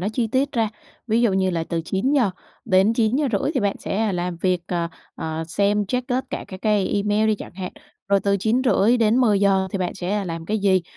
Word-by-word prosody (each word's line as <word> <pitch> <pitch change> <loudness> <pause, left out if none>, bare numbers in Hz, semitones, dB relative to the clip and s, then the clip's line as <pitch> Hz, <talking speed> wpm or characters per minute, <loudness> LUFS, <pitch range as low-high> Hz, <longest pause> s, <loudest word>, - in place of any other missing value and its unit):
nó 195 - -1
chi 240 -1 0
tiết 265 +5 0
ra, 225 -2 +1 0.4
ví 225 0 +2
dụ 235 -4 +3
như 190 0 +1
là 165 -2 -1
từ 170 - -1
9:00-9:30 220 - +1
thì 260 - +1
bạn 200 -1 0
sẽ 215 0 -1
làm 180 -1 -2
việc, 180 +1 0
ờ, 170 -2 -1 0.3
ờ, 160 0 -4
xem, 205 +3 +1
check 250 +5 -2
tất 255 +1 0
cả - - -4
các 185 -1 -9
cái 210 -3 +2
email 210 +1 +1
đi 215 - +3
chẳng 205 - -10
hạn, 185 -1 -6 0.4
rồi 200 0 +3
từ 200 0 +1
9:30-10:00 220 -3 +3
thì 195 - -2
bạn 180 - -2
sẽ 195 +3 -2
làm 165 -2 -5
cái 215 +3 0
gì? 190 -2 +3
200 Hz, 195 wpm, -22 LUFS, 185-225 Hz, 0.4 s, dụ